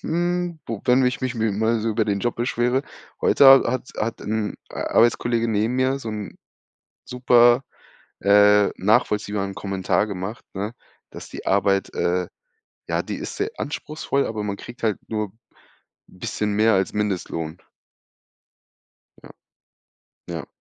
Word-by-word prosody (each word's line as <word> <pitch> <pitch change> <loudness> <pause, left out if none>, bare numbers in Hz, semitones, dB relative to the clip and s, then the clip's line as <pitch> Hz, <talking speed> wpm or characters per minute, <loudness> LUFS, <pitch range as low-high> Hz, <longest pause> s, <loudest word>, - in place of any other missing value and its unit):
hm, 175 0 -1
wo 115 -3 -4
wenn 125 0 +4
mich 125 -1 +1
mich 130 -1 -2
mal 110 0 +1
so 115 - -1
über 110 0 +1
den 100 -1 -1
Job 120 +2 -1
beschwere. 120 +2 0 0.4
Heute 140 - +5
hat 135 0 +9
hat 125 +1 -2
hat 115 +1 -3
'n, 110 0 -2 0.2
äh, - - -11
Arbeitskollege 115 0 +2
neben 110 +2 0
mir 130 +1 +1
so 120 -4 -7
'n 105 -2 -6 0.7
super, 120 0 +4 0.6
äh, 105 0 +5
nachvollziehbaren 105 -1 +1
Kommentar 95 +1 0
gemacht, 100 +2 -6
ne, 105 +4 -4 0.4
dass - - -10
die - - -9
Arbeit 100 0 +1
äh, 90 +1 0 0.6
ja, - - +1
die - - -5
ist - - -6
sehr - - -1
anspruchsvoll, 150 -1 -2
aber 110 -2 -4
man 100 -1 -3
kriegt 120 +2 -11
halt 110 -3 +1
nur 105 -1 -2
'n - - -27 0.8
bisschen 105 +3 -3
mehr 110 +2 +4
als 95 0 +1
Mindestlohn. 90 -5 -3 1.6
Ja. - - -15 1.0
Ja. 80 -5 -5
110 Hz, 145 wpm, -23 LUFS, 100-120 Hz, 1.6 s, hat